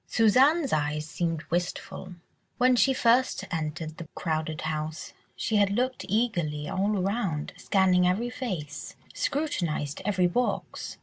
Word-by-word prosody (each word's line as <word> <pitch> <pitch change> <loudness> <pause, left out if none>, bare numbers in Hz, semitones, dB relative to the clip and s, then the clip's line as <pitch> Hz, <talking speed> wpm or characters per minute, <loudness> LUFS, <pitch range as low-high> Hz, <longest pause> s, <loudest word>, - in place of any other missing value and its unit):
Suzanne's 270 +7 +4
eyes 150 0 0
seemed 165 0 -2
wistful; 180 +1 -3 0.4
when 255 +1 +5
she 265 +2 +4
first 255 0 +2
entered 160 0 -3
the 170 - -7
crowded 160 -1 -2
house, 155 0 -4 0.2
she 220 - 0
had 200 -1 +4
looked 250 +5 -1
eagerly 170 -10 0
all 200 +3 0
around, 190 -5 -1
scanned 185 -2 +3
every 200 +7 +1
face, 155 - -5 0.2
scrutinised 175 - -1
every 185 -2 +2
box. 240 +8 -1
185 Hz, 125 wpm, -27 LUFS, 155-235 Hz, 0.4 s, when